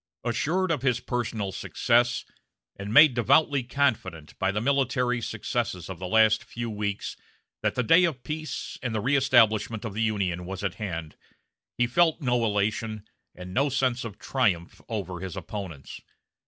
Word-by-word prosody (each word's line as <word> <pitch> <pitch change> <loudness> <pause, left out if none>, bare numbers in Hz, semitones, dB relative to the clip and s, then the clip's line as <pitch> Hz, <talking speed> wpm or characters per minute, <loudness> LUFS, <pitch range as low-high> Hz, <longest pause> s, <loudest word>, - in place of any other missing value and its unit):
Assured 165 +10 0
of 150 -6 0
his 125 -3 +1
personal 115 -5 -3
success, 120 +5 +1 0.5
and 100 +1 -6
made 150 +3 +8
devoutly 135 +5 +3
confident 120 - -1
by - - +1
the 105 - -1
military 125 -1 +1
successes 105 -5 -3
of 90 - -8
the 90 - -4
last 110 +2 +4
few 120 -1 -5
weeks 105 -1 -3 0.5
that - - 0
the 125 - +1
day 165 +10 +6
of 145 -7 -3
peace 155 0 -5
and 120 -3 -3
the - - +1
reëstablishment 120 -5 +3
of 110 - -4
the 110 - -2
Union 95 -5 -1
was 95 +1 -6
at 100 -3 -1
hand, 85 -6 -5 0.6
he 120 - +3
felt 160 +7 +2
no 125 -5 +1
elation, 110 0 -1 0.3
and 90 0 -9
no 140 +5 +2
sense 130 -2 0
of 110 -4 -7
triumph 100 -11 -1
over 95 -6 -4
his 95 +1 -6
opponents. 90 -7 -7
115 Hz, 160 wpm, -26 LUFS, 100-125 Hz, 0.6 s, made